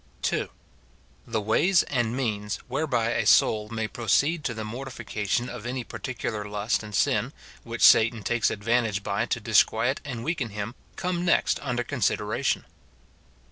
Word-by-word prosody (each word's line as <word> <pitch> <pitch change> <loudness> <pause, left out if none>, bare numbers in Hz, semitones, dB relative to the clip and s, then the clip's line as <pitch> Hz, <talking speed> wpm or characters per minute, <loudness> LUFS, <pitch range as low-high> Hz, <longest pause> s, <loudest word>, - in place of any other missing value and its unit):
II. - - -1 0.8
The 115 -2 -1
ways 170 - +3
and 120 -2 -1
means 105 -5 -2
whereby 125 -4 0
a - - 0
soul 105 -1 +4
may 110 -1 -2
proceed 140 - +1
to 115 - -1
the 110 - -4
mortification 115 -1 -3
of 120 -3 -7
any 125 0 -3
particular 115 -4 -4
lust 105 +2 -1
and 105 -2 -7
sin, - - +1 0.3
which - - -4
Satan 115 -1 +6
takes 120 +1 +1
advantage 110 -1 0
by 100 +3 -1
to 115 - -1
disquiet 115 +4 +2
and 125 -6 -5
weaken 150 -6 -2
him, 105 +2 -5 0.2
come 180 -1 -2
next 175 - +2
under 125 -3 -1
consideration. 120 -5 0
115 Hz, 145 wpm, -26 LUFS, 110-130 Hz, 0.8 s, Satan